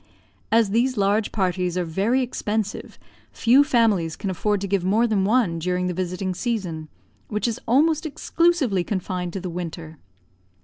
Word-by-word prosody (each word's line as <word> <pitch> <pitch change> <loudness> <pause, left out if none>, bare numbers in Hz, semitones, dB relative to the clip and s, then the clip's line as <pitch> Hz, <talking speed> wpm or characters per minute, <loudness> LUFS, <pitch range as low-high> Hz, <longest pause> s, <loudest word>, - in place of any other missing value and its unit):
As 225 -3 +3
these 245 +3 +1
large 205 +2 +1
parties 180 -3 -1
are 180 - +1
very 205 +11 +1
expensive, 215 -4 -3 0.3
few 255 +4 +4
families 220 - +2
can 195 - -3
afford 205 +3 0
to 200 - -2
give 195 -2 0
more 210 +6 +3
than 210 -4 +1
one 205 -7 +2
during 180 +2 -1
the 180 - -1
visiting 185 +1 -3
season, 180 -8 -3 0.4
which 210 +3 -1
is 230 - -3
almost 310 +6 +3
exclusively 305 - +1
confined 180 -2 -3
to 195 - -3
the 185 - -5
winter. 165 -3 -6
200 Hz, 160 wpm, -23 LUFS, 180-230 Hz, 0.4 s, few